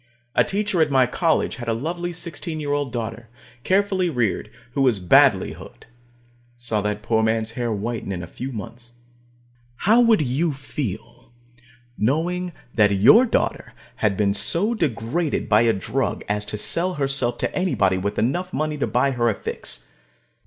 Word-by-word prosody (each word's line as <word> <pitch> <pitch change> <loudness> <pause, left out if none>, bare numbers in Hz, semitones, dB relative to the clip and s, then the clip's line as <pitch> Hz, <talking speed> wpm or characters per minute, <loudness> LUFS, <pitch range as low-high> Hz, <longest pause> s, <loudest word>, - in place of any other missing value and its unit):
A - - +4
teacher 200 -3 0
at 155 - +3
my 130 -2 +4
college 160 +6 0
had 120 -2 -7
a 115 - +1
lovely 175 +7 -3
sixteen 165 -1 -4
year 145 -1 -3
old 145 -3 -1
daughter, 115 -1 -5 0.3
carefully 190 -2 +1
reared, 120 - -1 0.2
who 140 - -1
was 125 -5 +3
badly 90 -2 +4
hooked. - - -13
I - - -30 0.7
saw 115 -3 -2
that 105 0 -3
poor 110 -1 +1
man's 110 0 0
hair 120 0 -2
whiten 110 0 -3
in 90 -2 -4
a - - -5
few 125 +9 -7
months. 120 +2 -9 0.8
How 220 - +4
would 225 -8 +4
you 145 +5 0
feel, 120 -5 -6 0.7
knowing 175 +9 0 0.2
that 105 -3 +4
your 215 - +6
daughter - - -1 0.2
had 100 -3 0
been 100 -2 +2
so 170 - +2
degraded 150 - -1
by 105 +1 +4
a 115 -1 +4
drug 95 -4 -2
as 105 0 -1
to 105 - -4
sell 175 - 0
herself 135 -4 0
to - - -3
anybody 100 - +1
with 100 +2 -3
enough 175 +10 0
money 155 -2 -2
to - - 0
buy 125 +5 +1
her 120 -2 +1
a 110 - 0
fix? - - -4
125 Hz, 170 wpm, -22 LUFS, 110-165 Hz, 0.8 s, your